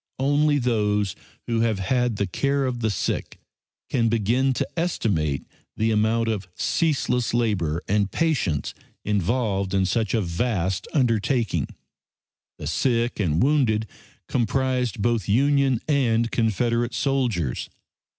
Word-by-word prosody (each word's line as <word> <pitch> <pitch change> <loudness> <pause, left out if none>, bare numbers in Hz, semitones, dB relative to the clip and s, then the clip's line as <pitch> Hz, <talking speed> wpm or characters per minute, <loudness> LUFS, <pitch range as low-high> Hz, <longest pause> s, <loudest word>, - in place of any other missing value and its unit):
Only 145 +2 +2
those 105 -6 0 0.3
who 115 -1 0
have 115 -2 +1
had 125 +4 0
the 100 - 0
care 140 +9 0
of 125 -2 -2
the 110 -1 0
sick 100 - -2 0.5
can 115 -3 +1
begin 115 +5 +2
to - - -1
estimate 95 - -1 0.3
the 110 +1 +1
amount 110 +2 +2
of 105 -5 -2
ceaseless 125 -7 0
labor 90 -9 0
and 100 0 +1
patience 140 - 0 0.3
involved 100 -1 0
in 95 -1 +3
such 110 +4 0
a 110 - +2
vast 95 +1 -1
undertaking. 115 - +1 0.9
The - - -7
sick 115 - 0
and 85 -5 +2
wounded 125 -7 +2 0.4
comprised 125 -2 0
both 120 -3 0
Union 135 +2 +3
and 115 -6 +2
Confederate 115 +1 0
soldiers. 120 - -1
115 Hz, 120 wpm, -24 LUFS, 100-130 Hz, 0.9 s, in